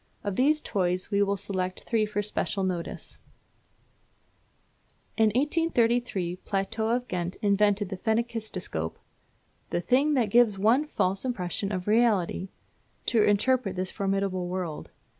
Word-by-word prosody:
Of 205 -2 -2
these 300 +6 +3
toys 185 0 -1
we 200 0 +2
will 200 0 +1
select 185 -2 -3
three 220 -2 +1
for 205 0 -2
special 200 -1 -1
notice. 180 -3 -4 2.0
In 225 - +4
1833 240 - +1
Plateau 210 +4 -2
of 245 +2 0
Ghent 180 -2 -3
invented 205 -1 +2
the 190 - -5
phenakistoscope, 220 - -2 0.7
"the - - 0
thing 275 - +2
that 230 -6 +1
gives 230 -3 +4
one 230 +9 +3
a - - -18
false 190 -8 0
impression 200 -5 -2
of 185 -2 -3
reality" 210 -5 +2 0.6
to 230 - +3
interpret 210 0 +2
this 185 0 -2
formidable 195 -2 -1
word. 175 -4 -4
205 Hz, 130 wpm, -27 LUFS, 185-235 Hz, 2.0 s, In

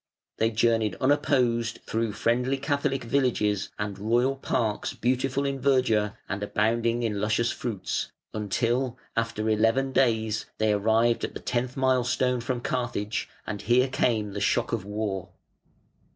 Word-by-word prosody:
They 110 - +2
journeyed 115 -1 +2
unopposed 130 -5 +1
through 115 -1 -1
friendly 125 +5 +1
Catholic 140 -1 -1
villages, 115 -6 +1
and 105 -1 -4
royal 120 +6 +2
parks 115 -5 -1
beautiful 130 +3 0
in 140 -1 -1
verdure 125 -6 +2
and 95 0 -3
abounding 115 +3 +1
in 105 -3 -1
luscious 110 +2 +1
fruits, 110 -6 -3 0.2
until, 120 +4 0 0.2
after 115 -1 -1
eleven 115 +5 +2
days, 110 -4 +1
they 110 -1 +2
arrived 110 +3 +2
at - - -3
the - - -4
tenth 125 +1 -2
milestone 125 -1 +2
from 120 0 -2
Carthage, 115 -4 -2 0.2
and 105 -2 -4
here 125 +5 +3
came 110 -5 0
the 100 - -4
shock - - +1
of - - -2
war. 105 -3 -3
115 Hz, 135 wpm, -27 LUFS, 105-130 Hz, 0.2 s, here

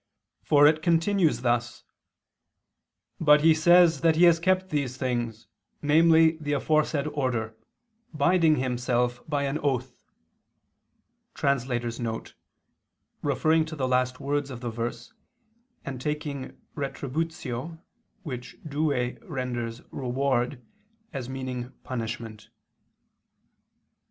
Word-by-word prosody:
For 145 -1 +5
it 155 +1 +4
continues 165 - +2
thus: 120 -1 -1 1.4
"But 150 -1 +5
he 160 +1 +6
says 170 -1 +5
that 165 -1 +4
he 170 - +4
has 170 -1 +6
kept 185 +2 +1
these 135 -4 -1
things, 120 -4 -3 0.4
namely 160 +1 +5
the 145 -1 -2
aforesaid 155 0 +1
order, 120 -6 -2 0.6
binding 160 +1 +3
himself 125 -2 -1
by 145 -2 0
an 140 +2 -1
oath 130 -3 -2 1.4
[*Referring 135 -2 +1 1.9
to 160 0 -7
the 130 -4 -1
last 125 0 +1
words 145 0 -1
of 125 -2 -8
the 120 -2 -3
verse, 120 - -5 0.7
and 130 -2 -5
taking 150 -2 -4 0.2
retributio, 150 +1 -4 0.4
which 125 -6 -7
Douay 140 -4 -1
renders 125 - -4
reward, 125 -1 -1 0.5
as 130 -3 -5
meaning 130 -1 -5
'punishment']. 115 -4 -6
140 Hz, 100 wpm, -26 LUFS, 125-155 Hz, 1.9 s, he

